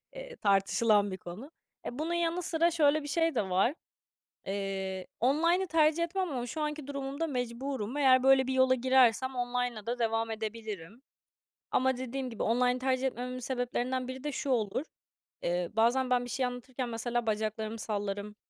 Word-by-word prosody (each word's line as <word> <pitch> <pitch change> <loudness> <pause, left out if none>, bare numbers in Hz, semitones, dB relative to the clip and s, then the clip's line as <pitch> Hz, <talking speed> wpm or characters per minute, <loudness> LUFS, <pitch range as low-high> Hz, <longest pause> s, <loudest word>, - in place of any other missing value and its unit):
eee, - - -8
tartışılan 205 +1 +3
bir 185 - -4
konu. 190 - -9 0.3
E, 245 +4 -5
bunun 330 +2 -1
yanı 345 +1 0
sıra 335 +1 +2
şöyle 310 -2 +3
bir - - -6
şey 325 0 +1
de 195 -4 0
var. 195 +10 +2 0.7
Eee, 195 -1 -3
online'ı 335 +9 +3
tercih 320 0 +3
etmem 365 0 -1
ama 245 -3 -3
şu 305 +6 -4
anki 300 -2 -3
durumumda 280 +3 -3
mecburum. 250 -2 -3
Eğer 260 -2 +5
böyle 265 -1 +5
bir 265 - 0
yola 260 0 +4
girersem 260 0 +3
online'la 245 -3 -2
da 240 +1 -2
devam 225 0 0
edebilirim. 220 -2 -6 0.7
Ama 260 0 +2
dediğim 260 +1 -4
gibi 225 - -4
online'ı 250 +2 +2
tercih 260 0 0
etmememin 250 0 -3
sebeplerinden 255 0 -2
biri 260 +2 -7
de 295 - -2
şu 275 - -3
olur, 230 +1 0 0.6
eee, 175 0 -1
bazen 240 +4 +2
ben 245 0 +3
bir 245 - -7
şey 255 +1 0
anlatırken, 250 +1 -5
mesela, 235 +1 -2
bacaklarımı 220 +1 -2
sallarım 205 -1 -3
250 Hz, 165 wpm, -30 LUFS, 220-275 Hz, 0.7 s, Eğer